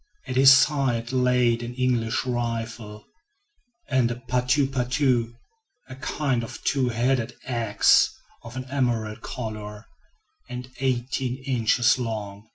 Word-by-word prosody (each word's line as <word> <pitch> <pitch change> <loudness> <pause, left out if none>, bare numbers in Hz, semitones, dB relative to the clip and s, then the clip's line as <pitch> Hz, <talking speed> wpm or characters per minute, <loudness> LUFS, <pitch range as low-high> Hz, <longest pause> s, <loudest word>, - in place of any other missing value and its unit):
At 130 -1 -5
his 135 +1 +8
side 135 -5 +3
lay 125 -2 +3
an 120 +1 -6
English 125 -3 0
rifle, 115 -3 -4 0.8
and 130 -4 +2
a 120 - -3
"patou 125 +3 +1
patou," 125 -2 0 0.5
a 130 - -8
kind 130 -3 -1
of 115 - -9
two 130 -3 +1
headed 120 0 0
ax 115 -4 +3 0.3
of 115 +2 -10
an 130 - -5
emerald 120 -5 -1
color, 110 -2 -6 0.6
and 125 0 -7
eighteen 130 0 -2
inches 120 -1 +2
long. 105 -3 -5
125 Hz, 120 wpm, -25 LUFS, 115-130 Hz, 0.8 s, his